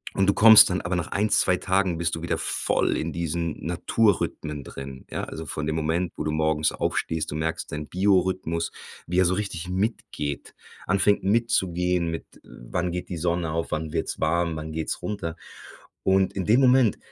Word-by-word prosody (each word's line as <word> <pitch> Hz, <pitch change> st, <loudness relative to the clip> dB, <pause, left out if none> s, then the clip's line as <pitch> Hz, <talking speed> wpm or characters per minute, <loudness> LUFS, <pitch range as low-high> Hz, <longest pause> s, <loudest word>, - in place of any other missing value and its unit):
Und 95 Hz, -, +2 dB
du 100 Hz, -, +4 dB
kommst 110 Hz, 0 st, +9 dB
dann 90 Hz, -, -1 dB
aber 90 Hz, +1 st, -2 dB
nach 90 Hz, -2 st, -2 dB
1, 105 Hz, +2 st, +1 dB
2 90 Hz, -, +3 dB
Tagen 95 Hz, -2 st, 0 dB
bist 85 Hz, 0 st, -1 dB
du 80 Hz, -, -7 dB
wieder 85 Hz, -, -1 dB
voll -, -, 0 dB
in -, -, -3 dB
diesen 85 Hz, -1 st, -3 dB
Naturrhythmen 85 Hz, -9 st, 0 dB
drin, 70 Hz, 0 st, -9 dB
ja. -, -, -3 dB
Also 80 Hz, -, -7 dB
von 75 Hz, 0 st, -4 dB
dem 80 Hz, -, -1 dB
Moment, 80 Hz, +3 st, -1 dB
wo -, -, -2 dB
du 75 Hz, -, -1 dB
morgens 80 Hz, 0 st, +1 dB
aufstehst, 80 Hz, -1 st, -2 dB
du -, -, -4 dB
merkst 80 Hz, +1 st, -3 dB
deinen 75 Hz, 0 st, -5 dB
Biorhythmus, 90 Hz, -3 st, +1 dB, 0.4 s
wie 90 Hz, +2 st, +1 dB
er 95 Hz, -, +5 dB
so 90 Hz, -, +2 dB
richtig 90 Hz, -4 st, -4 dB
mitgeht, 90 Hz, -, -3 dB, 0.3 s
anfängt 100 Hz, +2 st, +2 dB
mitzugehen 90 Hz, -5 st, +1 dB
mit: 80 Hz, -, -5 dB, 0.2 s
Wann 85 Hz, +9 st, -4 dB
geht 90 Hz, -, -5 dB
die 90 Hz, -, -4 dB
Sonne 85 Hz, 0 st, -1 dB
auf, 80 Hz, +1 st, -3 dB
wann 80 Hz, 0 st, -2 dB
wird's -, -, -2 dB
warm, 85 Hz, +1 st, +1 dB
wann 80 Hz, 0 st, -6 dB
geht's 80 Hz, 0 st, -3 dB
runter. 90 Hz, -6 st, -4 dB, 0.7 s
Und 95 Hz, 0 st, +3 dB
in 95 Hz, -2 st, -3 dB
dem 115 Hz, +5 st, +4 dB
Moment, 125 Hz, -4 st, +4 dB
85 Hz, 185 wpm, -25 LUFS, 80-95 Hz, 0.7 s, kommst